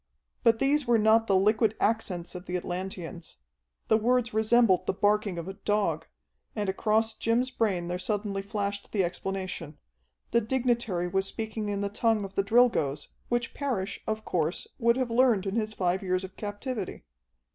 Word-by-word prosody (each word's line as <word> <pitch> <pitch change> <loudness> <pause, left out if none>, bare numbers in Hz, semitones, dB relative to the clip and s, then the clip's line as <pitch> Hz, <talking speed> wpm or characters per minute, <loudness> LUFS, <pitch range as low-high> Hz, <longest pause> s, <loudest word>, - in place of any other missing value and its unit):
But 225 -1 +4
these 275 +2 +2
were 235 -1 +5
not 220 +1 +4
the 195 - +3
liquid 215 +3 +3
accents 185 -6 -1
of 180 0 -8
the 180 - -1
Atlanteans. 175 - -6 0.5
The 220 - +5
words 240 +1 +1
resembled 220 -4 +3
the - - 0
barking 205 -2 +1
of 170 +1 -5
a 190 - -5
dog, 195 -5 -1 0.5
and 210 -2 -1
across 220 +3 +1
Jim's 240 +4 0
brain 195 -8 0
there 180 +1 -3
suddenly 200 0 -2
flashed 200 0 -4
the 200 -3 +2
explanation. 180 -3 -4 0.5
The 235 - +4
dignitary 235 -6 0
was 190 +2 0
speaking 220 -1 -4
in 200 -1 -2
the 200 - 0
tongue 220 0 +1
of 195 -1 -7
the 195 - +2
Drilgoes, 200 - +2 0.2
which 240 -1 -1
Parrish, 240 -9 -2
of 220 0 -2
course, 165 0 -1
would 235 0 +3
have 255 -3 -1
learned 230 -5 +3
in 195 - -2
his 215 -1 -1
five 180 0 0
years 185 -1 0
of 190 0 -8
captivity. 205 - -5
205 Hz, 170 wpm, -28 LUFS, 185-225 Hz, 0.5 s, were